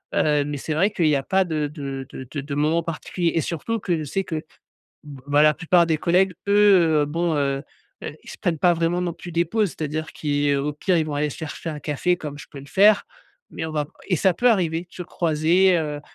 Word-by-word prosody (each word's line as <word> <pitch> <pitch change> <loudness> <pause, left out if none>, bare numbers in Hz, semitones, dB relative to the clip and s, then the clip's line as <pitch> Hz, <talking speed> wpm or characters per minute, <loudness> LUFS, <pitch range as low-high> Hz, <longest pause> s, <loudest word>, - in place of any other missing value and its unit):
heu, 150 -2 +2
mais 145 0 -4
c'est 155 +3 -4
vrai 180 +7 +2
qu'il 175 -6 +1
y 150 - +3
a 135 - -4
pas 190 +4 +2
de 155 -4 -2
de 140 -3 -6
de 130 - -8
de 150 - -4
de 140 +1 -5
moment 155 +3 +2
particuliers, 165 +1 -2
et 165 - +2
surtout 200 +9 -3
que 180 -4 -1
je 155 - -4
sais 195 +7 -2
que, 165 - -5 0.7
b 140 -3 -10
bah, 145 +1 +4
la 150 0 +6
plupart 175 +1 +3
des 160 -2 +1
collègues 180 +4 +2 0.2
eux, 185 -7 +5
bon, 165 +2 -1
heu 140 -1 -1 0.4
heu 150 - -6
ils - - -12
se - - -9
prennent 175 -5 -1
pas 175 -1 +4
vraiment 170 +1 0
non 175 -1 -2
plus 170 +1 -10
des 170 +1 +1
pauses. 210 +3 0
C'est-à-dire 155 0 -4
qu'ils 145 -1 0
au 145 +2 -2
pire 175 +4 +1
ils 160 - +1
vont 155 - -5
aller 150 +1 0
se 145 - -9
chercher 160 +1 -6
un 150 -2 -5
café 155 +5 0
comme 145 -3 -7
je - - -11
peux 140 - -9
le 140 - -11
faire 200 +6 +4 0.5
mais - - -5
on 160 - -6
va 150 -1 -1 0.2
et 185 - +2
ça 190 +2 +3
peut 245 +8 +3
arriver 170 -6 +1
de 180 - -15
se 180 - -7
croiser, 170 +2 +2
heu 150 -2 -3
160 Hz, 250 wpm, -23 LUFS, 150-175 Hz, 0.7 s, la